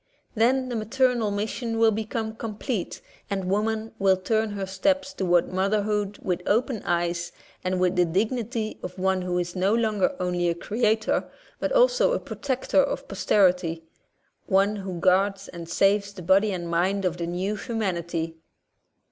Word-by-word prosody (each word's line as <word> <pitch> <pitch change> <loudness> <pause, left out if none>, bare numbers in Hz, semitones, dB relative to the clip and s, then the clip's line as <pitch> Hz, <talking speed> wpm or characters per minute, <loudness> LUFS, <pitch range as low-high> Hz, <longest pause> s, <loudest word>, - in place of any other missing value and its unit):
Then 255 +3 +2
the 245 - -3
maternal 240 0 +1
mission 220 +3 -2
will 225 0 +5
become 220 +1 -3
com 225 -2 -5
plete 215 -3 -3 0.3
and 195 -2 -2
woman 220 +2 0
will 190 -1 +4
turn 220 +3 0
her 200 -1 -3
steps 280 +10 0
toward 175 -2 +1
motherhood 205 +1 0
with 180 -1 -1
open 230 0 +1
eyes 175 0 0 0.3
and 185 0 0
with 185 0 +2
the 180 -1 +4
dig 195 +7 +1
nity 230 -3 -4
of 180 +1 -6
one 190 0 +1
who 180 0 -1
is 175 0 -2
no 190 +4 +2
longer 220 +2 +1
only 180 -1 0
a 170 - 0
creator 220 +3 0 0.3
but - - -1
also - - +4
a - - 0
protector 265 -2 0
of - - -3
posterity, 180 -4 +2 0.6
one 200 +2 +3
who 190 -3 -5
guards 195 +2 +2
and 170 -1 -8
saves 200 +3 +2
the 185 - -9
body 195 +4 +4
and 175 -2 -4
mind 185 +4 +1
of 175 -1 0
the 170 - -3
new 185 +4 -2
humanity. 175 -8 -3
200 Hz, 165 wpm, -25 LUFS, 180-220 Hz, 0.6 s, will